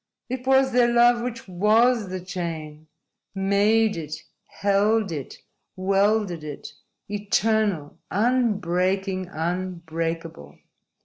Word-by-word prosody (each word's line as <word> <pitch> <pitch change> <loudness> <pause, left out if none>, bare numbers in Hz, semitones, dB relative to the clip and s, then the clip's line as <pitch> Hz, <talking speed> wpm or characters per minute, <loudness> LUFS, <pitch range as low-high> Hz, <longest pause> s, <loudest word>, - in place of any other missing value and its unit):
It 255 0 -5
was 265 0 +4
their 245 0 +4
love 240 0 +5
which 235 -2 -5
WAS 215 +4 +3
the 185 0 -4
chain 160 -4 -6 0.5
made 205 +3 +2
it, 155 -2 -6 0.2
held 205 +1 +1
it, 145 -5 -6 0.4
welded 195 -2 +1
it, 150 -2 -8 0.3
eternal, 205 -5 0
unbreaking, 195 -4 0
unbreakable. 165 - -4
195 Hz, 90 wpm, -24 LUFS, 170-220 Hz, 0.5 s, love